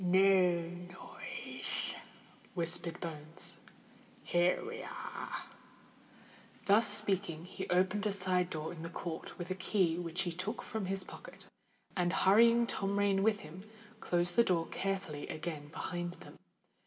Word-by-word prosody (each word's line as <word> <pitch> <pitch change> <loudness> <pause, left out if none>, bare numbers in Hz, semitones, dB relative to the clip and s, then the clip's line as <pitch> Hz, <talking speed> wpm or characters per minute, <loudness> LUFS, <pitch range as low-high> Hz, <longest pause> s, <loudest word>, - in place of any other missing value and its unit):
"No 185 -1 +5
noise," 175 +1 -6 0.6
whispered 170 0 +1
Bones. 160 0 -3 0.6
"Here 175 - +2
we 465 +3 -5
are." - - -6 1.2
Thus 210 +3 +6
speaking, 190 -5 0
he 190 +1 -6
opened 190 +3 +2
a - - +1
side 185 -2 +1
door 155 -1 -3
in 165 - -8
the 165 - -5
court 165 -1 -5
with 175 +1 -5
a - - +3
key 185 -3 +1
which 170 0 0
he 175 - -1
took 180 +7 -3
from 215 -4 -3
his 195 0 -1
pocket, - - -10 0.5
and, 180 -1 +1
hurrying 230 +5 +6
Tom 200 -3 -1
Rain 200 -1 +3
with 210 0 +3
him, 155 +5 -9 0.4
closed 175 -2 +1
the 235 - +7
door 170 -6 +2
carefully 190 -7 -2
again 155 -2 -4
behind 175 +3 -3
them. - - -13
180 Hz, 140 wpm, -34 LUFS, 170-195 Hz, 1.2 s, the